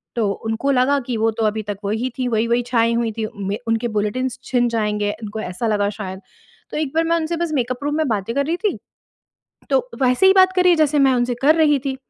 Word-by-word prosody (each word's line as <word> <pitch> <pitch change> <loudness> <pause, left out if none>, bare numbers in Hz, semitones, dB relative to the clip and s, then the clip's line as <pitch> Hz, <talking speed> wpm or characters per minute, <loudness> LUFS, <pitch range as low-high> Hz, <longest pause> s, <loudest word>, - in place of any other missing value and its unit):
तो 225 -4 +1 0.2
उनको 225 +5 0
लगा 275 +2 +3
कि 245 -3 -2
वो 225 +1 +2
तो 225 - +2
अभी 215 0 -1
तक 200 - -6
वही 220 +5 -1
थी, 255 - 0
वही-वही 235 +1 +1
छाई 230 -1 +2
हुई 230 -1 0
थीं, 220 0 -3 0.2
में 200 +1 -1
उनके 225 +1 0
बुलेटिन्स 250 +5 -2
छिन 245 -2 +1
जाएँगे, 210 -2 -1
उनको 215 +1 -5
ऐसा 185 +5 -3
लगा 205 -2 +1
शायद। 190 -2 -5 0.5
तो - - -4
एक 305 -3 -2
बार 325 - +3
मैं 335 +1 +2
उनसे 330 +1 -2
बस 340 -1 -2
मेकअप 255 0 -2
रूम 295 - 0
में 315 -1 +1
बातें 220 +1 -2
कर 280 - +1
रही 330 +4 -1
थी, 420 +1 -1 0.9
तो - - +1
वैसे 255 +8 +4
ही 380 - +8
बात 375 -1 +5
कर 365 - +4
रही 360 - +5
है - - +3
जैसे 300 -2 +2
मैं 270 -2 +4
उनसे 245 0 0
कर 300 +3 +5
रही 300 -3 +4
थी, 265 - -2
245 Hz, 245 wpm, -20 LUFS, 220-295 Hz, 0.9 s, ही